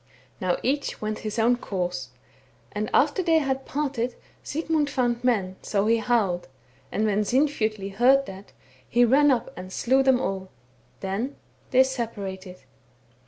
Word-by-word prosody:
Now 185 -1 0
each 280 +3 -1
went 215 0 -3
his 215 0 -5
own 235 +2 +3
course; 180 -5 -3 0.6
and - - -3
after 380 - +3
that - - -7
they 325 -1 +5
had 270 -3 -1
parted 265 -4 -2 0.3
Sigmund 315 -1 -1
found 245 -3 0
men, 195 -7 +1
so 200 -1 0
he 230 +1 +4
howled; 215 -7 0 0.4
and 215 - 0
when 210 -1 +2
Sinfjotli 220 -5 0
heard 265 +6 +4
that, 195 -1 -10 0.4
he 240 +1 +4
ran 285 +5 +5
up 250 -4 0
and 185 +1 -8
slew 260 +7 +2
them 265 -2 +4
all 190 -6 -3 0.3
— 120 0 -35
then 205 +9 -3 0.3
they 260 0 +6
separated. 200 -8 -5
235 Hz, 155 wpm, -25 LUFS, 195-265 Hz, 0.6 s, they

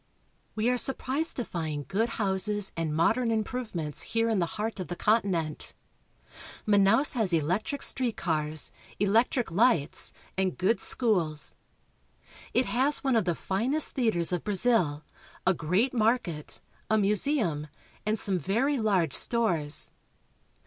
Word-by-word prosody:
We 220 +1 0
are 250 0 +2
surprised 275 +5 +1
to 245 - -2
find 155 -4 -4
good 225 +4 0
houses 200 0 0
and 165 -2 -2
modern 230 +9 +2
im 220 -1 +1
provements 200 - -4
here 230 0 0
in 220 -3 +1
the 170 - +1
heart 215 0 -3
of 185 - -4
the 175 - -5
continent. 185 -8 0 0.9
Manaos 205 +7 +4
326 - - +1
BRAZIL. 250 - -3
has 190 -5 0
electric 215 - -2
street 250 -4 0
cars, 155 -2 0 0.3
electric 225 +3 +1
lights, 185 - +2 0.2
and 190 -1 -1
good 200 +5 +1
schools. 170 - +1 1.0
It 250 +3 +2
has 265 +6 +1
one 265 -3 +2
of 220 -4 +2
the 175 -2 0
finest 245 - 0
theaters 200 -10 +1
of 175 - -2
Brazil, 195 -8 +1 0.4
a 185 - +4
great 185 - 0
market, 220 -10 -1 0.3
a 220 - +3
museum, 205 - +1 0.4
and 215 +2 0
some 195 -3 -1
very 245 - 0
large 190 -9 +1
stores. 175 -11 +1
205 Hz, 140 wpm, -28 LUFS, 170-235 Hz, 1.0 s, Manaos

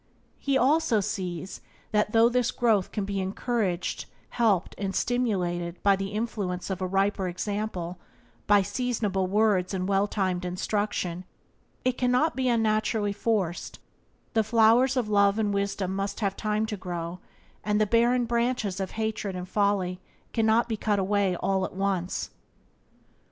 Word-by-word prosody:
He 275 -1 +1
also 265 -3 +3
sees 185 -3 -4 0.3
that 210 0 +1
though 225 +1 +6
this 245 0 +1
growth 225 -7 +1
can 205 -3 -2
be 200 0 -2
encouraged, 190 -1 -2 0.2
helped, 210 -7 +1
and 195 -1 -2
stimulated 180 -8 -1
by 200 -1 +5
the 195 0 -3
influence 200 -4 -3
of 190 0 -3
a 185 - 0
riper 195 0 +1
example, 185 -2 -3 0.5
by 205 -1 +5
seasonable 205 -3 -1
words 200 -2 +2
and 185 0 -2
well 200 +1 +2
timed 185 -3 -1
instruction, 180 -1 -2 0.6
it 255 -1 +1
cannot 250 +6 +2
be 260 -1 +1
unnaturally 215 -2 +1
forced; 200 -5 -1 0.6
the 220 -2 +3
flowers 230 +4 +4
of 240 -4 +1
love 200 -1 +3
and 210 -2 +1
wisdom 200 -1 -1
must 195 0 -3
have 195 -2 0
time 215 +1 0
to 215 -1 -4
grow, 175 -1 -5 0.4
and 210 0 +1
the 215 - +4
barren 235 +3 +3
branches 235 -4 0
of 190 -1 -2
hatred 220 -3 -2
and 180 0 -5
folly 195 -3 0 0.3
cannot 225 +1 +3
be 225 -2 -2
all - - -30
cut 210 -2 +1
away 195 -1 +1
at - - -9 0.3
once. 190 -2 -2
205 Hz, 150 wpm, -27 LUFS, 190-225 Hz, 0.6 s, though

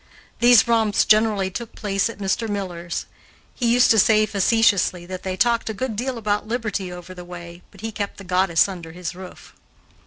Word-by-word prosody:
These 240 -1 +6
romps 225 -3 +2
generally 215 -3 +3
took 235 +3 -7
place 200 0 -1
at 230 - -9
Mr. 205 +3 -1
Miller's. 175 -4 -4 0.5
He 235 -2 0
used 245 +1 +5
to 220 - +5
say 215 +1 +4
facetiously, 200 -3 +2
that 185 0 -7
they 185 -1 -4
talked 235 0 +1
a 220 - -4
good 245 +1 -3
deal 250 +3 -3
about 210 -1 -1
liberty 215 -5 -3
over 180 +1 -9
the 180 -1 -10
way, 175 0 -10
but 195 - -16
he 225 0 -4
kept 205 -2 -5
the 195 - -10
goddess 180 -2 +2
under 170 -4 -8
his 180 +1 -5
roof. 185 0 -12
200 Hz, 190 wpm, -22 LUFS, 185-225 Hz, 0.5 s, These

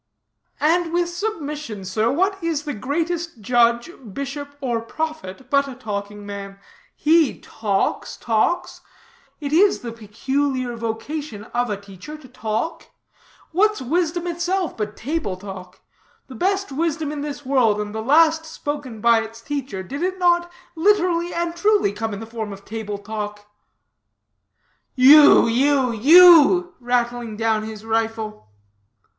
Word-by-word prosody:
"And 330 +2 +2
with 345 0 +1
submission, 300 - -5
sir, 215 +5 0
what 380 +5 0
is 325 -3 -1
the 295 -2 -4
greatest 330 +6 -3
judge, 235 - +2 0.2
bishop 285 +1 -6
or 240 -5 -1
prophet, 265 -4 -6
but 280 0 +3
a 265 - -8
talking 205 -3 -6
man? 200 -1 -7 0.4
He 315 -2 +3
talks, 205 -3 -2
talks. 230 +9 -1 0.6
It 290 -1 -4
is 390 +5 +4
the 235 - -6
peculiar 255 +3 -2
vocation 230 +1 -5
of 245 0 0
a 205 - -2
teacher 200 +9 -11
to 295 -4 -15
talk. 235 +4 -4 0.6
What's 420 +5 +2
wisdom 335 +5 -1
itself 350 +1 -2
but 210 -1 -5
table 275 - -3
talk? 185 -2 -10 0.4
The 265 - -12
best 390 - -1
wisdom 315 +1 -1
in 295 -1 -5
this 290 -1 -6
world, 245 -6 +2
and 210 0 -4
the 220 - -3
last 320 +6 +4
spoken 290 -7 -6
by 230 0 +4
its 225 +1 -9
teacher, 265 -6 -5
did 275 - -6
it 370 +1 -1
not 345 -1 +2 0.2
literally 350 -1 +2
and 340 0 -2
truly 410 - +2
come 220 +2 -4
in 200 - -5
the 225 - -7
form 220 -2 -6
of 200 0 -11
table 215 -2 -5
talk?" 210 0 -6 1.5
"You, 285 +3 +8
you, 260 +2 +2
you!" 345 - +7
rattling 240 -2 -1
down 225 -1 +1
his 215 0 -8
rifle. 225 - -2
265 Hz, 140 wpm, -21 LUFS, 220-325 Hz, 1.5 s, You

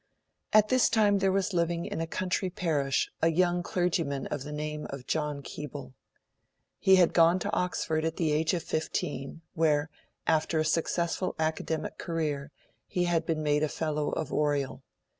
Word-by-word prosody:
At 215 0 +5
this 255 -1 +4
time, 210 -3 +3
there 195 0 +2
was 195 0 0
living 170 0 0
in - - -3
a 165 - -2
country 185 +2 -1
parish, 150 -7 0
a 165 - +4
young 175 +1 +2
clergyman 165 -6 -1
of - - -3
the 150 +2 -6
name 150 0 -4
of 135 -2 -7
John 150 -2 -2
Keble. 140 -3 -7 0.9
He 190 - +6
had 180 -3 +4
gone 170 +1 +5
to 185 - -3
Oxford 160 -3 0
at 160 0 -1
the 160 -3 +1
age 160 +4 +2
of 170 - -3
fifteen, 155 -1 -3
where, 155 -1 +2 0.3
after 160 0 +2
a 155 - +2
successful 170 +3 0
academic 160 0 -2
career, 150 -4 -2 0.4
he 180 - 0
had 170 -2 +1
been 155 -2 0
made 150 0 +2
a 155 - +1
Fellow 150 -1 -1
of 160 - -3
Oriel. 145 -3 0
160 Hz, 170 wpm, -29 LUFS, 150-175 Hz, 0.9 s, He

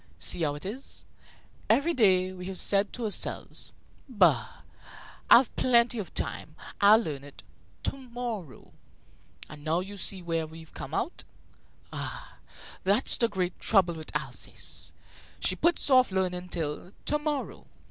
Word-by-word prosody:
See 175 - -2
how 145 -2 +1
it 145 - -9
is! 235 +8 -6 0.6
Every 330 +5 +3
day 185 - +4
we 180 0 -8
have 190 -1 -3
said 200 0 +4
to 245 - -5
ourselves: 210 - -2 0.4
'Bah! 170 - +2 0.7
I've 245 +1 +7
plenty 240 -1 +3
of 195 - -5
time. 155 0 -3 0.3
I'll 205 +2 +8
learn 150 -11 -3
it 145 0 -12 0.4
to - - -2
morrow.' 235 - -7 0.7
And 150 -1 -11
now 160 +2 +1
you 200 +2 -8
see 190 -1 -2
where 165 -2 -1
we've 160 0 -13
come - - -6
out. - - -1 0.7
Ah, - - -6 0.4
that's 200 +7 +4
the 235 - +3
great 185 -4 -2
trouble 190 -5 +3
with 155 -2 -9
Alsace; 135 -4 -3 0.5
she - - +1
puts 345 +1 +2
off 255 -1 +6
learning 180 -1 -1
till 165 +3 -4
to 300 - +1
morrow. 295 -2 -3
190 Hz, 145 wpm, -28 LUFS, 165-235 Hz, 0.7 s, I'll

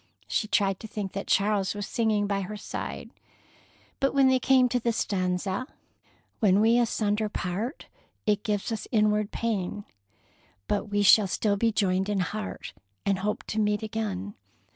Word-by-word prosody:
She 215 - 0
tried 195 -3 +1
to 220 - -8
think 205 -3 -4
that 195 - -4
Charles 200 0 +2
was 205 -1 -3
singing 215 -3 +1
by 200 -1 -1
her 210 +3 -5
side, - - -6 0.9
but 275 0 +1
when 270 -1 +5
they 260 0 +3
came 260 -1 +4
to 245 - +1
the 235 0 0
stanza: 190 +1 -1 0.7
When 200 -3 +4
we 230 +3 +4
asunder 215 -2 0
part, 205 - -4 0.4
it 205 -1 +2
gives 210 +1 -1
us 225 - -4
inward 210 -2 +2
pain, 210 -3 -2 0.8
But 205 - 0
we 205 -1 0
shall 205 +1 +7
still 200 +2 +1
be 225 +3 +2
joined 190 -2 +1
in 200 -2 +1
heart, 210 +3 -5 0.3
and 195 -1 +1
hope 210 +2 -2
to 220 - -1
meet 210 0 +1
again. 205 -3 -3
210 Hz, 165 wpm, -27 LUFS, 195-220 Hz, 0.9 s, shall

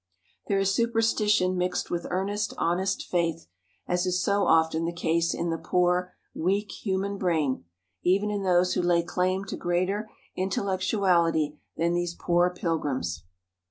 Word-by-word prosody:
There 200 - +1
is 195 0 +2
superstition 215 -4 +2
mixed 180 0 -1
with 175 -1 -2
earnest, 200 +3 -2
honest 185 +3 0
faith, 170 -2 -1 0.4
as 180 +1 0
is 180 0 +1
so 200 +2 +1
often 160 0 +3
the 170 - -1
case 170 -1 0
in 170 0 -2
the 165 - -2
poor, 180 0 +1 0.2
weak 200 +5 0
human 195 0 -2
brain, 155 - 0 0.4
even 200 +3 +2
in 205 -1 -2
those 180 -1 +3
who - - +1
lay 175 -1 +2
claim 185 +2 -1
to - - -5
greater 185 +5 -1 0.3
intellectuality 185 -5 +1 0.2
than 170 +1 +1
these 175 0 -1
poor 175 +1 +2
pilgrims. 145 - -2
180 Hz, 145 wpm, -27 LUFS, 170-195 Hz, 0.4 s, often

